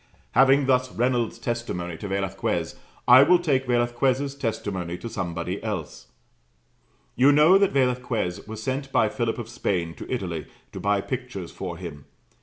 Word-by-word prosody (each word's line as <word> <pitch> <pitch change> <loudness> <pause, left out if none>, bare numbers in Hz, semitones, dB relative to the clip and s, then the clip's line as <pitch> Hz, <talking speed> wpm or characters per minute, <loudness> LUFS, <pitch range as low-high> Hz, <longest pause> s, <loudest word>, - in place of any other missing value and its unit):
Having 135 +2 +5
thus 130 -1 +2
Reynolds' 120 -1 0
testimony 90 -8 -4
to 100 - -6
Velasquez, 95 -1 -2 0.3
I 125 +2 +9
will 175 +6 +6
take 140 -7 0
Velasquez' 125 +3 +1
testimony 100 -9 -3
to 115 - -7
somebody 90 -2 -4
else. 90 - -5 1.1
You 135 +3 +5
know 155 +7 +6
that 200 -1 +3
Velasquez 125 -9 0
was 110 0 -7
sent 135 +2 -3
by 110 - +3
Philip 115 0 -2
of 120 -3 -5
Spain 90 -8 -2
to - - -9
Italy, 90 -10 -3 0.2
to - - -7
buy 100 -1 +1
pictures 120 -7 -5
for 90 -3 -6
him. 75 -6 -8
120 Hz, 150 wpm, -25 LUFS, 95-130 Hz, 1.1 s, I